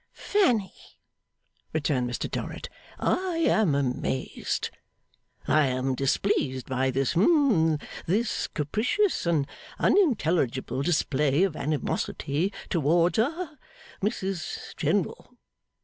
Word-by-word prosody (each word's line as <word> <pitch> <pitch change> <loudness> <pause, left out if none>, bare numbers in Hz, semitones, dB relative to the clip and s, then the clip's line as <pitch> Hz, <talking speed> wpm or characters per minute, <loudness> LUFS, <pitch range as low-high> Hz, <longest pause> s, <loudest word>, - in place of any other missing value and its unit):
'Fanny,' 245 - 0 0.8
returned 140 -5 0
Mr 120 - -3
Dorrit, - - -5 0.3
'I 370 -2 0
am 200 -10 +3
amazed, 130 -1 -2 0.8
I 155 -2 +4
am 130 +1 0
displeased 130 -1 0
by 130 0 0
this 130 0 0
hum 190 - +4 0.3
this 215 +7 0
capricious 225 - 0
and 155 -5 +2 0.3
unintelligible 165 - +2
display 150 -1 +2
of 190 -5 0
animosity 150 +3 -1 0.2
towards 170 +3 +2
ha 310 +6 -1 0.4
Mrs 190 -5 -3
General. - - -1
160 Hz, 90 wpm, -27 LUFS, 135-215 Hz, 0.8 s, I